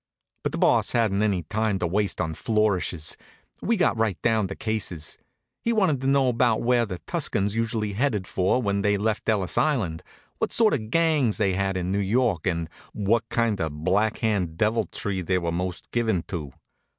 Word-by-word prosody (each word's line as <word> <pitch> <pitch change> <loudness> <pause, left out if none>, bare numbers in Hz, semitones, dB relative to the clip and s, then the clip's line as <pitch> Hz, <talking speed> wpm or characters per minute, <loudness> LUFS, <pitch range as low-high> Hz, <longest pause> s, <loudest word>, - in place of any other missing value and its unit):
But - - -2
the - - -4
Boss - - +3
hadn't 110 -4 +2
any 100 -5 +1
time 105 +4 -1
to 90 - -1
waste 100 +4 0
on 80 -3 -1
flourishes. 95 -6 0 0.5
We 230 0 +1
got 180 - +2
right 110 -5 0
down 110 -4 +2
to 95 - -6
cases. 95 -8 -3 0.4
He 235 - 0
wanted 185 - +2
to 135 - -1
know 135 -1 +3
about 120 -2 +2
where 120 -1 +3
the 90 -3 -5
Tuscans 105 - 0
usually 110 -2 -1
headed 105 -4 0
for 95 +7 +1
when 100 -1 0
they 105 +1 +2
left 110 +2 -1
Ellis 100 -5 +1
Island, 110 - 0 0.4
what - - 0
sort 225 -2 +4
of 110 -6 -2
gangs 155 -6 +2
they 100 -3 +1
had 95 0 0
in 90 0 -2
New 100 - +1
York 105 -3 +1
and 85 -2 -1 0.3
what 115 +3 0
kind 115 -5 0
of 75 -1 -4
Black 105 +5 +2
Hand 95 -8 -1
deviltry 105 -2 -1
they 90 +1 0
were 85 -2 -1
most 90 -1 -4
given 110 -7 0
to. 80 -8 -4
105 Hz, 185 wpm, -25 LUFS, 95-115 Hz, 0.5 s, sort